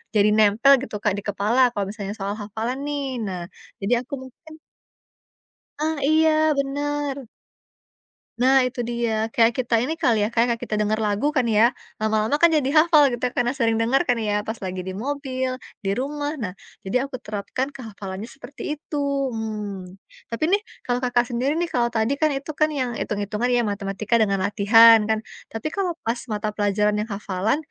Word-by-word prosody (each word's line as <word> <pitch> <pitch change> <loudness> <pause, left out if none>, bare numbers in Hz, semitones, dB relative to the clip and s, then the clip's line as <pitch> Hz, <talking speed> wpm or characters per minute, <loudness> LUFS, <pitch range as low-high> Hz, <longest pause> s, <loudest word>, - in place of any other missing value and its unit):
jadi 210 0 +5
nempel 220 +6 +5
gitu 270 - -6
Kak 210 - +2
di 200 - -5
kepala 205 +5 0
kalau 205 -4 -2
misalnya 200 -1 -5
soal 195 +1 -2
hafalan 220 +5 -4
nih. 290 -1 -2 0.2
Nah, 185 -2 -4 0.4
jadi 205 +5 +1
aku 260 +3 -12
mungkin 315 +5 -15 1.3
Ah, 315 0 -1
iya 310 +1 +4
bener! 280 -1 -2 1.1
Nah 265 +1 +5
itu 250 0 -11
dia, 225 -2 -1
kayak 230 0 +4
kita 230 -2 +2
ini 315 +6 -2
kali 225 -7 +2
ya, 210 - +1
kayak 235 0 +1
kita 215 - -2
dengar 215 +1 0
lagu 215 +8 0
kan 255 -5 +1
ya, 225 +3 +4 0.2
lama-lama 220 +5 +1
kan 335 0 +5
jadi 285 -4 +2
hafal 310 -3 +6
gitu, 240 0 -2
karena 240 0 +1
sering 230 -2 +1
dengar 270 +8 +2
kan 245 - +3
ya, 210 -1 -1
pas 220 - -2
lagi 185 -1 -4
di 190 - -5
mobil, 260 +2 -3 0.2
di 195 - -2
rumah. 290 +3 -3
Nah, 195 -7 -4 0.3
jadi 255 +8 0
aku 255 - -5
terapkan 230 +7 -4
ke 265 - -10
hafalannya 200 -1 -7
seperti 285 +2 -7
itu, 295 0 -6 0.4
mmm. 205 -4 -5 0.3
Tapi 230 +6 -4
nih, 410 - +3 0.2
kalau 245 0 0
Kakak 245 -1 +2
sendiri 265 +6 0
nih 345 - +1
kalau 240 -1 +2
tadi 230 +2 0
kan 310 - +4
itu 285 +2 -4
kan 305 +1 +2
yang 255 -5 -2
hitung-hitungan 210 +3 -2
ya, 240 - +3
matematika 205 +2 -1
dengan 200 -2 +2
latihan 225 +2 +7
kan. 220 0 +2 0.3
Tapi 225 +6 -4
kalau 360 -4 -2
pas 235 +1 -1
mata 210 0 -2
pelajaran 210 0 +1
yang 215 - -5
hafalan, 200 +3 -1
235 Hz, 180 wpm, -23 LUFS, 210-275 Hz, 1.3 s, latihan